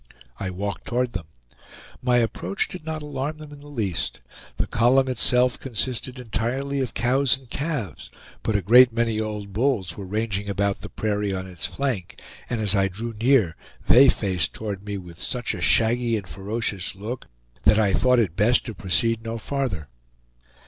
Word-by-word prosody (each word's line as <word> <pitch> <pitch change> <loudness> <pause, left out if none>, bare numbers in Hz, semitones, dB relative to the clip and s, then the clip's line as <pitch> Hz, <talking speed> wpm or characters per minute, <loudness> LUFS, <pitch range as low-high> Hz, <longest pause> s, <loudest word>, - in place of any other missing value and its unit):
I 95 - -2
walked 100 +2 -4
toward 125 0 0
them. 85 -5 -5 0.7
My 125 -1 +3
approach 120 - 0
did 180 - -9
not 155 -1 -3
alarm 150 +1 -3
them 155 -1 -11
in 145 - -11
the 145 - -13
least. 110 - -2 0.4
The - - +1
column 130 +4 +3
itself 125 0 +2
consisted 130 +1 -3
entirely 130 +4 -2
of 130 -5 -2
cows 130 +3 +2
and 130 -1 -18
calves, 120 - -3 0.3
but 110 - -1
a 100 - +1
great 120 +5 +8
many 115 -1 0
old 105 -2 -4
bulls 105 -7 0
were 100 -2 -7
ranging 105 0 -2
about 100 0 0
the - - -7
prairie 105 -2 -1
on 95 0 -4
its 90 -3 -4
flank, 125 -11 -3 0.3
and 120 - -1
as 105 -3 +2
I 100 -2 +3
drew 115 +5 -5
near 115 -9 +4 0.3
they 135 +3 +8
faced 90 -7 0
toward 100 -3 -5
me 100 -1 -4
with 90 -2 -10
such 125 -2 -2
a 90 - -6
shaggy 115 +4 +3
and 100 -3 -7
ferocious 100 -2 -3
look 110 +6 -6 0.4
that 105 - +6
I 105 -3 +3
thought 125 +3 +4
it 100 -8 +1
best 110 +5 +3
to 115 - -5
proceed 105 +5 0
no 115 0 -3
farther. 115 - -2
115 Hz, 175 wpm, -24 LUFS, 100-125 Hz, 0.7 s, great